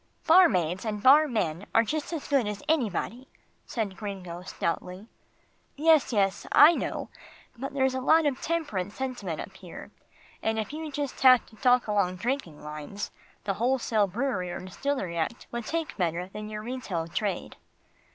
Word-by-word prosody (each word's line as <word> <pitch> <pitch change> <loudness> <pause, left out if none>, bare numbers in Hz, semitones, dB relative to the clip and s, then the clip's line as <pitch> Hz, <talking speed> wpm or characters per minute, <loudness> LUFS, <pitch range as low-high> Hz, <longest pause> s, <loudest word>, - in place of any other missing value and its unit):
"Barmaids 190 - +4
and 210 -2 -3
barmen 240 - +4
are 225 - +6
just 300 +8 -3
as 325 -4 -4
good 275 -6 +2
as 210 +3 -5
anybody," 250 - -1 0.4
said 210 -5 -3
Gringo 185 -4 -6
stoutly. 180 +2 -4 0.7
"Yes, 310 -1 +4
yes, 195 -3 +1
I 300 +4 +8
know, - - -3 0.5
but 270 +3 -6
there's 265 -1 +2
a 260 - -2
lot 320 +4 +4
of 275 -3 0
temperance 215 - -2
sentiment 245 -11 -4
up - - -7
here, - - -10 0.5
and 220 0 0
if 220 +6 -3
you 310 0 -5
just 285 -1 -4
have 255 -2 +7
to 220 - -18
talk 250 +1 +3
along 200 -4 +1
drinking 190 - -3
lines, 150 +7 -6 0.3
the 200 - -1
wholesale 230 -2 +1
brewery 195 -3 -2
or - - -5
distillery 185 -2 -3
act 230 +9 -3
would 235 -2 -4
take 330 -1 -2
better 175 -1 -1
than 210 +2 -7
your 210 0 -6
retail 215 -9 -4
trade. 190 +1 -3
220 Hz, 160 wpm, -28 LUFS, 185-270 Hz, 0.7 s, I